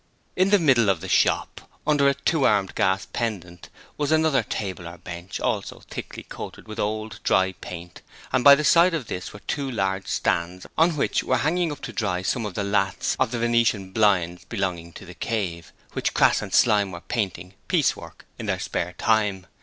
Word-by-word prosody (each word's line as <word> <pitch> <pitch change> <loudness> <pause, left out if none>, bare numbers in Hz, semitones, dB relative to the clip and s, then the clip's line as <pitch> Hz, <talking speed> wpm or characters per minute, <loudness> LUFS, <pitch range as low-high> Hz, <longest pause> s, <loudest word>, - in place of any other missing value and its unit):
In 185 +1 +3
the 205 - +6
middle 130 - +4
of 95 -4 +2
the - - -7
shop, - - +1 0.2
under 145 -2 +4
a 140 - 0
two 140 +2 0
armed 100 -5 +2
gas 95 +1 +1
pendant, 90 -7 -4 0.3
was 145 0 0
another 160 -4 +3
table 95 -5 -5
or 85 +1 -9
bench, 85 +1 -7
also - - -2
thickly - - -7
coated - - -9
with 110 +1 -7
old, 110 +1 -3
dried 95 0 +1
paint, 90 0 -9 0.3
and 130 - +2
by 140 -1 +10
the 150 - -2
side 170 +3 +5
of 145 -7 -3
this 90 -4 -5
were 105 - -12
two 140 -2 -3
large 95 -5 -1
stands 90 +2 -1
on 165 0 +3
which - - +1
were 130 - +1
hanging 165 +5 +1
up 145 - -8
to - - -6
dry 90 -4 -1
some 115 +3 -1
of 100 - -8
the 100 - -1
lathes 100 -2 0
of - - +2
the 120 - -3
venetian 115 -5 +1
blinds 90 -5 +2
belonging 90 -6 -3
to - - -11
'The 90 - -10
Cave', 90 -6 -3 0.2
which - - -2
Crass - - +4
and - - -6
Slyme 100 -2 +4
were 90 -1 -8
painting 95 -5 -3
piecework - - -1
in - - -5
their - - 0
spare 90 +1 -3
time. 105 -4 +1
105 Hz, 195 wpm, -24 LUFS, 90-130 Hz, 0.3 s, by